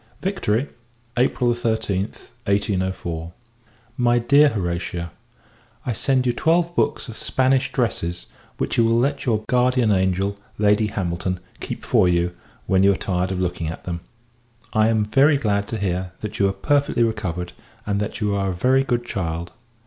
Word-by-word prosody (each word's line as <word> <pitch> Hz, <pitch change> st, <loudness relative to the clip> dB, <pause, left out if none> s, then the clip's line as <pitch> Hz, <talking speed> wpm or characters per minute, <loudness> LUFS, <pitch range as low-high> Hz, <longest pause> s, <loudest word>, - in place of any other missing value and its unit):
Victory, 145 Hz, -, 0 dB, 0.5 s
April 125 Hz, 0 st, +2 dB
13th, 110 Hz, -4 st, -2 dB, 0.2 s
1804. 95 Hz, -4 st, -1 dB, 0.7 s
MY 120 Hz, -1 st, +3 dB
DEAR 140 Hz, +5 st, +5 dB
HORATIA, 85 Hz, -, -3 dB, 0.7 s
I 125 Hz, -, 0 dB
send 130 Hz, +2 st, +1 dB
you 120 Hz, -, +2 dB
twelve 170 Hz, +5 st, +2 dB
books 145 Hz, -4 st, 0 dB
of 115 Hz, -, -8 dB
Spanish 130 Hz, +2 st, +1 dB
dresses, 90 Hz, -8 st, -2 dB, 0.3 s
which -, -, -1 dB
you -, -, +6 dB
will 115 Hz, +1 st, +3 dB
let 140 Hz, +3 st, 0 dB
your 110 Hz, -3 st, +1 dB
guardian 125 Hz, -2 st, +3 dB
angel, 95 Hz, +1 st, +1 dB, 0.2 s
Lady 105 Hz, +1 st, +3 dB
Hamilton, 90 Hz, -2 st, -2 dB, 0.2 s
keep -, -, -6 dB
for 90 Hz, -, +4 dB
you, 85 Hz, 0 st, +1 dB, 0.3 s
when 95 Hz, 0 st, +3 dB
you 100 Hz, +1 st, +5 dB
are -, -, -4 dB
tired 90 Hz, 0 st, -1 dB
of 95 Hz, -, -2 dB
looking 90 Hz, -2 st, -2 dB
at 80 Hz, -, -6 dB
them. 85 Hz, -1 st, -4 dB, 0.7 s
I 110 Hz, 0 st, +4 dB
am 110 Hz, -2 st, +2 dB
very 140 Hz, +7 st, +4 dB
glad 100 Hz, -6 st, 0 dB
to 115 Hz, -, -3 dB
hear, 95 Hz, -2 st, -2 dB
that 105 Hz, 0 st, -5 dB
you 100 Hz, -1 st, +4 dB
are -, -, 0 dB
perfectly 145 Hz, +2 st, +1 dB
recovered; 95 Hz, -6 st, -2 dB, 0.3 s
and, 100 Hz, -1 st, 0 dB
that 105 Hz, +1 st, -3 dB
you 105 Hz, -2 st, 0 dB
are 100 Hz, -1 st, 0 dB
a 90 Hz, -, -2 dB
very 130 Hz, +8 st, +3 dB
good 120 Hz, -2 st, -1 dB
child. 85 Hz, -5 st, -3 dB
105 Hz, 165 wpm, -22 LUFS, 90-120 Hz, 0.7 s, you